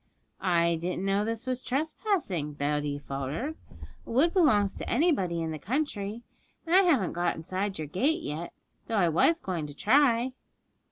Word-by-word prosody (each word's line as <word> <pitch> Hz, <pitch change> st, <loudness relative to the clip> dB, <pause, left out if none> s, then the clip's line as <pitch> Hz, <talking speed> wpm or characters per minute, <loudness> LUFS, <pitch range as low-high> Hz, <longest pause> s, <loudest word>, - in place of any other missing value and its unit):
'I 170 Hz, -2 st, +2 dB
didn't 180 Hz, +2 st, -2 dB
know 195 Hz, +1 st, +2 dB
this 225 Hz, +1 st, -3 dB
was 255 Hz, -1 st, -2 dB
trespassing,' 275 Hz, -, -1 dB
Betty 145 Hz, 0 st, -1 dB
faltered; 145 Hz, -, -4 dB, 0.5 s
'a -, -, -15 dB
wood 290 Hz, +9 st, +3 dB
belongs 215 Hz, -, +3 dB
to -, -, -5 dB
anybody 200 Hz, -, +1 dB
in 160 Hz, -, -3 dB
the 155 Hz, -, -5 dB
country, 225 Hz, -, -2 dB, 0.4 s
and 335 Hz, +2 st, +2 dB
I 385 Hz, -, +8 dB
haven't 290 Hz, -, +2 dB
got 175 Hz, 0 st, 0 dB
inside 190 Hz, +4 st, -3 dB
your 155 Hz, -1 st, -4 dB
gate 265 Hz, -, 0 dB
yet, 155 Hz, +4 st, -4 dB, 0.4 s
though 225 Hz, -, -1 dB
I 175 Hz, -4 st, +4 dB
was 185 Hz, -, +3 dB
going 175 Hz, -, -4 dB
to 145 Hz, -, -10 dB
try.' 250 Hz, -, +3 dB
200 Hz, 165 wpm, -28 LUFS, 165-265 Hz, 0.5 s, I